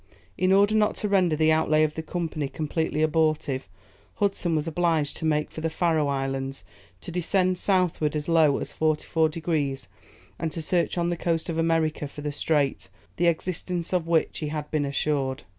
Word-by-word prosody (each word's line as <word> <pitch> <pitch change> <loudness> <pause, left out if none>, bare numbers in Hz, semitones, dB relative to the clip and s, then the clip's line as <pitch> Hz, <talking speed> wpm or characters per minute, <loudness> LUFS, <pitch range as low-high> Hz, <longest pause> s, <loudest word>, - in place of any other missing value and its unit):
In 185 0 +1
order 200 +2 +5
not 215 -1 +2
to 210 - -2
render 185 -5 +3
the 155 +1 +3
outlay 155 -1 +3
of 155 -1 0
the 160 - -4
Company 160 -3 -3
completely 155 0 -1
abortive, 155 -4 +1 0.5
Hudson 195 -4 0
was 155 +1 -1
obliged 165 -3 0
to 160 - -4
make 150 -1 +1
for 160 - -7
the 165 - 0
Faröe 160 -3 +1
Islands, 135 0 -3 0.4
to - - -7
descend 180 +1 +1
southward 180 -6 +1
as 150 -1 -3
low 160 -4 +4
as - - -4
44 155 +1 +1
degrees, 155 -4 -2 0.5
and 165 - -2
to - - -4
search 170 +2 0
on 170 0 +1
the - - 0
coast 165 -1 -1
of 165 -1 -2
America 160 -2 +1
for 145 - -10
the 150 0 -3
strait, 145 -6 0
of 95 - -23 0.3
the 175 - +2
existence 175 +1 -1
of 175 -3 0
which 165 -1 +1
he 155 - -3
had 150 0 -5
been 150 -2 +1
assured. 140 -1 -1
160 Hz, 190 wpm, -26 LUFS, 150-170 Hz, 0.5 s, order